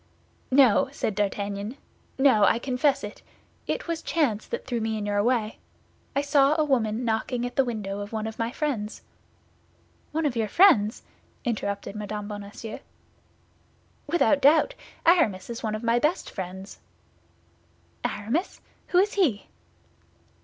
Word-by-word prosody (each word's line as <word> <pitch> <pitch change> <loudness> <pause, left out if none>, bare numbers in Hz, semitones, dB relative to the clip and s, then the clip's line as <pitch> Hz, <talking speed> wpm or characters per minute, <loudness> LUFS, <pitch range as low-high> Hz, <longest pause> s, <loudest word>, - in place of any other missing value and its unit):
"No," 260 -4 +5
said 215 - -2
D'Artagnan; 205 +3 -2 0.4
"no, 265 -6 +5
I 215 - +5
confess 270 +3 +1
it. 205 - -7 0.5
It - - -2
was 335 -1 -2
chance 260 -13 0
that - - -5
threw 240 -3 -2
me 220 0 -1
in 210 - -3
your 205 0 +1
way; 225 -2 0 0.6
I 280 - +2
saw 285 0 +4
a 310 - +3
woman 240 -4 0
knocking 235 +2 -1
at 245 - -5
the 270 - +4
window 210 -5 -4
of 205 0 -6
one 220 -1 -3
of 220 0 -6
my 230 +1 -1
friends." 245 -8 -3 1.1
"One 320 +1 -1
of 275 -4 0
your 225 -2 0
friends?" 220 - +4 0.4
interrupted 200 -3 -3
Mme. 210 0 -5
Bonacieux. 205 +1 -7 1.3
"Without 290 -3 +3
doubt; 315 - +5 0.3
Aramis 245 - +3
is 235 - -6
one 215 -2 -2
of 215 - -6
my 235 +1 +3
best 300 +7 0
friends." 190 +1 -7 1.2
"Aramis! 245 - -2 0.3
Who 355 - +1
is 400 +3 +4
he?" 295 - +1
230 Hz, 145 wpm, -26 LUFS, 210-280 Hz, 1.3 s, No